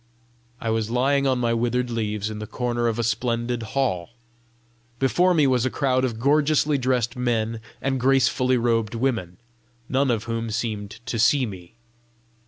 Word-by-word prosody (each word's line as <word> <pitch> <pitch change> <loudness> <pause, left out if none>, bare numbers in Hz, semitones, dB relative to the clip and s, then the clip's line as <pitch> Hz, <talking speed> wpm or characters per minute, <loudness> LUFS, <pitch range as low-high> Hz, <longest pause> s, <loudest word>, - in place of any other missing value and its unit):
I 115 - -2
was 110 -1 -1
lying 135 +3 +2
on 130 -1 +2
my 120 -1 +1
withered 120 +1 0
leaves 105 -2 -2
in 105 - -6
the 105 - -6
corner 120 0 -1
of 115 -1 -1
a 120 - 0
splendid 120 +1 -1 0.2
hall. 95 -11 0 0.9
Before 175 +8 +3
me 155 -3 +4
was 130 -3 +2
a 130 - +1
crowd 130 -1 +1
of 115 -4 -2
gorgeously 150 +2 +2
dressed 125 -2 0
men 115 -2 -1 0.2
and 135 -1 0
gracefully 130 0 +3
robed 115 -2 0
women, 115 -8 -1 0.5
none 135 +1 +1
of 115 -3 0
whom 115 0 -3
seemed 110 -2 -3
to 120 -3 -3
see 130 +4 +4
me. 95 -3 -9
120 Hz, 165 wpm, -24 LUFS, 115-130 Hz, 0.9 s, me